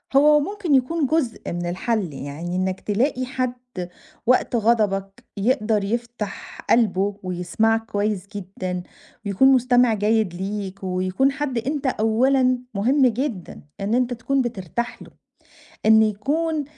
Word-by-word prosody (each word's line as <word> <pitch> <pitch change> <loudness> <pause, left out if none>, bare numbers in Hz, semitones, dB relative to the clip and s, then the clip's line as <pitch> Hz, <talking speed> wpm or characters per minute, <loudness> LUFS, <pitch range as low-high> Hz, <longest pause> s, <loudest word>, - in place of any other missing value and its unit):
هو 295 +2 +6
ممكن 365 -1 0
يكُون 280 +5 +1
جزء 290 -5 0
من 175 0 -3
الحل، 190 - -1
يعني 145 +6 -5
إنك 185 0 -1
تلاقي 255 +5 0
حد 255 -1 -2 0.7
وقت 250 0 +2
غضبك 210 -2 +1
يقدَر 215 -1 +1
يفتَح 230 -1 -4
قلْبه 205 -3 +2
ويسمَعك 185 +5 0
كويس 205 -3 -2
جدًا 185 -2 -4 0.4
ويكُون 200 +6 +4
مستمِع 250 -2 +4
جيد 215 -2 +1
ليك، 195 +1 -4
ويكُون 185 +8 +1
حد 275 -3 -3
أنت 275 +4 -2
أولًا 255 +3 +2
مهم 255 +7 +3
جدًا 235 - -3 0.2
إن 205 +3 -1
أنت 250 0 +1
تكُون 265 +3 0
بترتاح 235 0 -4
له، - - -11 0.8
إن 220 0 +7
يكُون 290 +9 0
225 Hz, 125 wpm, -23 LUFS, 195-255 Hz, 0.8 s, إن